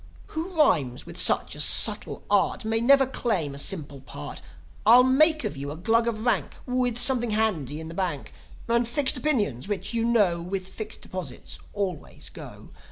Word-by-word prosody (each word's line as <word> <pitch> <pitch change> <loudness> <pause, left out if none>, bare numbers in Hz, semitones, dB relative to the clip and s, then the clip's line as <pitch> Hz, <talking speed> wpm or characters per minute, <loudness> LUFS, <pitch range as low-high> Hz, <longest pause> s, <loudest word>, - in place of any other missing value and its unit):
"Who 320 +3 -4
rhymes 140 - +1
with - - -11
such - - +2
a - - -9
subtle - - +4
art - - +1
May 225 +1 0
never 270 +2 +5
claim 210 - -2
a 140 - -6
simple 145 -4 -1
part. 75 - -9 0.4
I'll 240 +4 +7
make 305 +4 +3
of 210 -7 -4
you 140 +1 -6
a 150 - -7
Glug 230 +6 +1
of 220 -1 -3
rank, 240 - 0
With 250 -2 -1
something 245 -1 +4
handy 185 - -1
in 160 - -7
the 165 - -8
bank, 170 -6 -4 0.3
And 235 0 +1
fixed 265 +3 +1
opinions, 215 - -1
which, 205 +2 -4
you 230 -1 0
know, 205 -8 +2
With 185 +2 -5
fixed 215 +3 -7
deposits 175 -9 -7 0.2
always 190 -6 -5
go. - - -12
215 Hz, 175 wpm, -25 LUFS, 165-245 Hz, 0.4 s, I'll